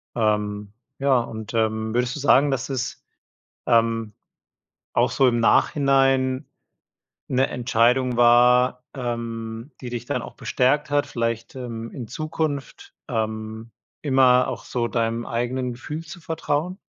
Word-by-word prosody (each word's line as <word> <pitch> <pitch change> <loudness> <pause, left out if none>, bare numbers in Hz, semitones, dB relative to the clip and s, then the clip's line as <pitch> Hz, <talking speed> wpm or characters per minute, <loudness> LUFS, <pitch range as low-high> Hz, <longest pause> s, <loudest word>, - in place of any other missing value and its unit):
Ähm, 105 -2 0 0.3
ja, 135 -2 +3
und, 110 -1 -7
ähm, 110 0 0
würdest 125 +1 0
du - - -5
sagen, 140 0 +5
dass 135 -1 -2
es, 130 -2 -4 0.6
ähm, 115 -2 +2 0.8
auch - - +3
so 135 - +3
im 120 -1 +1
Nachhinein 135 0 +3 0.8
'ne 130 +1 +2
Entscheidung 125 +1 +2
war, 125 +1 +5
ähm, 115 -1 -5
die 125 - -6
dich 120 -2 -5
dann - - -2
auch - - -9
bestärkt 145 +4 +1
hat, 145 0 +2
vielleicht, 115 -1 -3
ähm, 115 -3 -6
in 120 - -6
Zukunft, 155 - -4
ähm, 110 -1 -3 0.3
immer 130 -3 +4
auch - - -5
so 120 -1 -2
deinem 115 0 -1
eigenen 125 +2 -2
Gefühl 150 +6 -6
zu 160 +2 -10
vertrauen? 165 +1 -2
125 Hz, 130 wpm, -23 LUFS, 115-135 Hz, 0.8 s, sagen